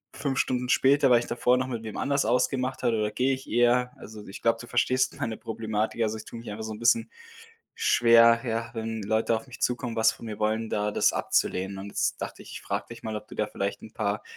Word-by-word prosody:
5 135 -2 -2
Stunden 125 -1 0
später, 135 0 +4
weil 120 - +7
ich 120 - -6
davor 125 +1 +2
noch 130 0 -1
mit 115 -3 -5
wem 110 - -7
anders 140 -2 +1
ausgemacht 125 +2 0
habe 115 -2 +2
oder 105 0 0
gehe 130 +5 +1
ich 135 - -12
eher 120 +1 +3
also 105 0 -11
ich 95 - -9
glaube, 115 0 +2
du - - -8
verstehst 130 +2 +1
meine 110 -1 -2
Problematik. 110 0 -3
Also 110 0 -1
ich - - -10
tue 115 - -9
mich 115 - -9
einfach 110 +1 -6
so 110 - -5
'n 105 - -9
bisschen 225 - +2 0.6
schwer, 115 - +5
ja, 115 +1 -2
wenn 110 -2 -4
Leute 110 +2 +1
auf 110 - -5
mich 125 - -12
zukommen, 125 -1 -1
was 110 0 +4
von - - -11
mir 105 -1 -6
wollen, 110 +1 0
da 105 0 0
das - - +2
abzulehnen. 95 +1 0
Und 100 +1 -7
jetzt - - -1
dachte - - -6
ich, - - -12
ich - - -7
frage - - -3
dich - - -10
mal, 110 -1 -4
ob 105 0 -7
du - - -11
da 105 - 0
vielleicht 100 -1 -3
'n 110 - -11
paar 105 0 -2
115 Hz, 245 wpm, -27 LUFS, 110-125 Hz, 0.6 s, weil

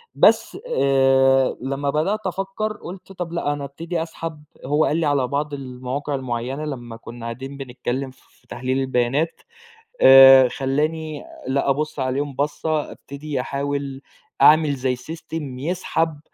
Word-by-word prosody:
بس - - +4
آآ 135 - +3
لما 135 +2 -2
بدأت 160 +9 0
أفكّر 195 +3 -2
قُلت 185 +1 -10
طب 180 -3 -5
لأ، 155 -4 0
أنا 145 -1 -5
أبتدي 165 +4 -4
أسحب 165 -2 -7 0.2
هو 150 +3 +2
قال 155 - +1
لي 165 - +1
على 140 -3 +2
بعض 145 +3 -2
المواقع 135 +1 -4
المُعيّنة 130 +2 -3
لمّا 120 -6 -6
كُنّا 115 0 -10
قاعدين 130 +4 -6
بنتكلم 130 0 -4
ف - - -24
في 125 - -30
تحليل 130 +2 -2
البيانات، 135 +5 0 0.6
آآ 135 -1 +9
خلّاني 150 +4 -2 0.3
لأ، 140 +1 +1
أبُص 150 +2 -1
عليهم 135 +2 -1
بصة، 150 +2 -1
أبتدي 140 -1 -6
أحاول 140 0 -3 0.4
أعمل 155 -2 +6
زي 130 -1 -1
سيستم 150 0 -7
يسحب 160 0 -1
140 Hz, 140 wpm, -22 LUFS, 130-155 Hz, 0.6 s, آآ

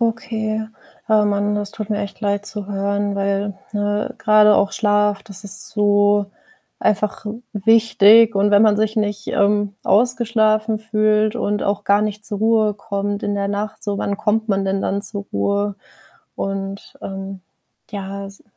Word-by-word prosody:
Okay. 220 -1 -2 0.4
Oh, 215 -1 +4
Mann, 205 0 0
das 205 -1 -3
tut 215 -1 -6
mir 210 -2 -1
echt 200 - -6
leid 205 -1 -1
zu 210 -2 -5
hören. 200 0 -1
Weil, 200 0 -1 0.2
ne, 205 0 -2
grade 210 0 +5
auch 200 0 +1
Schlaf, 205 -1 +1
das 200 -2 -10
ist 200 +1 -1
so 205 -1 +2 0.5
einfach 210 0 0 0.3
wichtig 225 +1 +5
und 200 +1 +2
wenn 205 0 +5
man 215 -1 +4
sich 215 0 0
nicht, 205 -1 -2
ähm, 205 0 +1
ausgeschlafen 220 -1 +2
fühlt 215 0 +1
und 205 -3 -1
auch 200 0 -1
gar 200 +1 +3
nicht 210 0 -4
zur 205 - -4
Ruhe 220 -1 +2
kommt 200 0 -4
in 205 - -1
der 200 0 -1
Nacht 205 +1 -4
so, 205 -2 -2
wann 200 0 -2
kommt 220 +1 0
man 195 -1 +1
denn 195 0 -1
dann 200 - -1
zur 200 0 -6
Ruhe? 200 - -1 0.6
Und, 195 0 -5
ähm, 195 0 -6 0.5
ja 200 -1 -6
es 195 0 -14
205 Hz, 160 wpm, -20 LUFS, 200-215 Hz, 0.6 s, grade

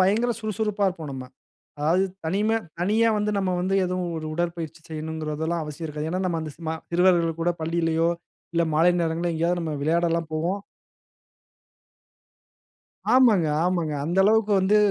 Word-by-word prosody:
பயங்கர 215 +6 +3
சுறுசுறுப்பா 215 -1 -1
இருப்போம் 160 -5 -6
நம்ம. 130 -1 -6 0.6
அதாவது 170 +6 +3 0.2
தனிமை 210 +7 +1 0.2
தனியா 220 +5 +3
வந்து, 210 0 0
நம்ம 190 -1 0
வந்து 190 +2 0
ஏதுவும் 180 -1 -2
ஒரு 155 -1 -4
உடற்பயிற்சி 170 -1 -3
செய்யனும்கிறதெல்லாம் 160 +1 -3
அவசியம் 150 +2 -6
இருக்காது. 150 +1 -4
ஏனா 185 +1 -1
நம்ம 170 -2 -1
அந்த 155 -2 -6
ஸ்மா 160 -1 -3 0.2
சிறுவர்கள் 170 -2 +3
கூட 175 - +2
பள்ளியிலேயோ, 165 0 +1 0.5
இல்லை 170 - +3
மாலை 165 +3 +5
நேரங்கள்லயோ 170 +1 0
எங்கேயாவது 170 +2 +1
நம்ம 160 -2 -3
விளையாடல்லாம் 165 +1 +1
போவோம். 175 +6 -1 2.5
ஆமாங்க, 225 -10 +5 0.2
ஆமாங்க, 175 -4 0
அந்த 175 +4 -1
அளவுக்கு 215 0 +3
வந்து 195 +3 +3
170 Hz, 140 wpm, -25 LUFS, 160-190 Hz, 2.5 s, மாலை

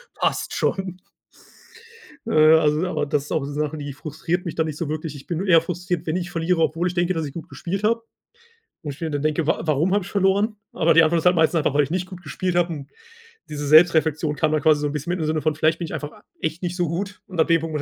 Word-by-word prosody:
passt - - -1
schon. 185 -2 -2 1.3
Äh, - - -2 0.3
also 150 +3 +2
aber 155 -4 -1
das 145 -1 0
ist - - -12
auch 155 - 0
so 140 - -6
Sachen, 150 +1 -2
die 145 -1 -6
frustriert 160 +5 -3
mich 170 - -4
dann 160 -1 0
nicht 150 -2 -5
so 160 -2 -3
wirklich. 155 -1 -4
Ich 140 -1 -12
bin 170 - -2
nur 195 - -3
eher 165 -3 +6
frustriert, 180 0 -3
wenn 155 - -1
ich 175 -1 -3
verliere, 165 0 0
obwohl 165 +3 +1
ich 180 - -3
denke, 175 0 +1
dass 160 -3 -2
ich 140 - -7
gut 165 - -8
gespielt 175 +9 -4
habe. 230 +2 +1 0.8
Und 145 -2 -5
ich 140 - -17
mir 160 - -2
dann 145 -1 -2
denke, 155 +1 0
wa 160 - +1
warum 155 +4 +1
habe 205 -2 +1
ich 200 - -10
verloren. 200 +2 +2 0.2
Aber 165 0 +3
die 165 +1 +7
Antwort 165 +1 +3
ist 160 - -7
halt 180 0 +5
meistens 160 +1 +3
einfach, 150 -3 +1
weil 145 - +4
ich 140 - -5
nicht 180 +1 -1
gut 185 -2 -10
gespielt 180 +4 -3
habe 175 0 +2
und 140 -3 -8 0.6
diese 145 -1 -4
Selbstreflexion 155 -1 +4
kam 155 0 +1
dann 155 -1 +1
quasi 155 -1 +4
so 150 - 0
'n - - -3
bisschen 150 +3 -4
mit 180 - -2
im 160 - -1
Sinne 155 0 0
von: 155 0 0
„Vielleicht 155 +1 +1
bin 170 - -3
ich - - -8
einfach 150 0 -5
a - - -19 0.2
echt 160 +2 -3
nicht 175 0 -3
so 175 -2 +1
gut.“ 190 +5 -4
Und 185 -4 -8
ab 160 - +4
dem 165 -1 +4
Punkt 165 -1 -5
muss 150 - -1
160 Hz, 280 wpm, -23 LUFS, 150-180 Hz, 1.3 s, die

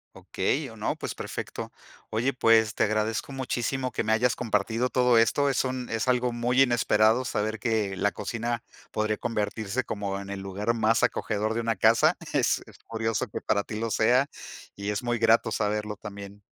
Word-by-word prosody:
Okey, - - -2
o, - - -12
no, - - -2
pues, - - -5
perfecto. - - -6 0.4
Oye, 120 +5 0
pues 110 -2 +4
te - - +1
agradezco 110 +3 -1
muchísimo 130 0 -2
que - - -2
me 110 - 0
hayas 120 +2 +3
compartido 115 +1 0
todo 125 -2 +4
esto, 140 +6 +3
es 135 - +1
un 130 -1 -3
es 115 +2 -2
algo 125 -1 +2
muy 120 +2 +3
inesperado 120 -1 +3
saber 110 -2 -2
que, 110 -5 0
la 100 +2 +1
cocina 115 0 -3 0.3
podría 110 0 0
convertirse 110 +1 -2
como 100 -1 -3
en 100 0 -8
el 100 - -4
lugar 100 +4 -1
más 115 0 +2
acogedor 110 0 0
de 115 - -1
una 115 0 0
casa. 110 +4 +4 0.2
Es - - +2
es - - -17
curioso 115 +1 -1
que 105 - -5
para 100 - +1
ti 105 +1 -6
lo 115 0 -2
sea 125 +6 +4 0.5
y 100 +1 -4
es 105 +3 -2
muy 120 -1 -1
grato 115 0 +4
saberlo 105 0 -1
también. 100 0 -9
115 Hz, 185 wpm, -27 LUFS, 105-120 Hz, 0.5 s, pues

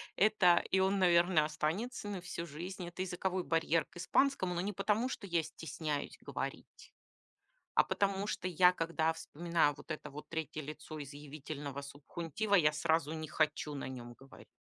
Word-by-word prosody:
это- 195 -4 +5
и 190 - +4
он, 190 +1 +3
наверно, 175 -3 +5
останется 170 +10 -2
на 195 -3 -4
всю 170 -1 -5
жизнь- 175 +4 -6
это 175 +1 -6
языковой 185 0 -1
барьер 165 -1 +2
к 185 - -16
испанскому, 185 0 +2
но 175 - -1
не 205 +3 -2
потому, 210 +6 +1
что 225 - -5
я 170 -3 +2
стесняюсь 155 -1 -4
говорить. - - -6 0.8
А - - +6
потому 200 0 0
что 185 -3 -2
я, 180 +1 +6
когда 165 -2 +1
вспоминаю 165 -1 +1
вот - - -14
это 155 - -4
вот 150 +2 -9
3 160 -1 -3
лицо 155 +1 -7
изъявительного 145 0 -6
субхунтива, 165 +8 -3
я 155 -6 +6
сразу 155 0 +1
не 155 -1 -4
хочу 155 -1 0
на 140 - -4
нём 120 -2 -7
говорить. 135 +2 -15
165 Hz, 165 wpm, -34 LUFS, 150-185 Hz, 0.8 s, А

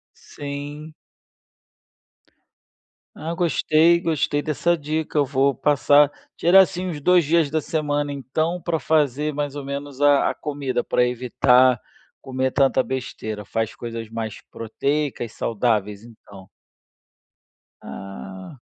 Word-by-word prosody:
Sim. 145 +2 -8 2.2
Ah, 165 +2 -5
gostei, 170 -1 +3
gostei 150 -3 0
dessa 170 +3 0
dica. 155 +1 -3
Eu 145 - +4
vou 140 0 +2
passar 145 +1 +4 0.3
tirar 185 +3 +7
assim 185 -1 -1
uns 155 -4 -5
2 180 +1 +4
dias 160 -1 +2
da 155 +1 0
semana, 145 -2 -2
então, 155 +7 -2
para 165 -2 -1
fazer 150 -1 +1
mais 145 0 -3
ou 145 - -6
menos 140 0 -6
a 145 -1 +4
a - - -4
comida, 140 -4 -3
para 125 - +2
evitar 125 0 +3 0.4
comer 130 -1 -2
tanta 135 -1 +3
besteira. 110 -5 -5
Faz 115 +1 -2
coisas 115 -2 -6
mais 110 -2 -5
proteicas, 135 +1 -2
saudáveis, 105 -3 -1
então. 100 -5 -15 1.3
Ah. 95 - -9
140 Hz, 120 wpm, -22 LUFS, 120-155 Hz, 2.2 s, tirar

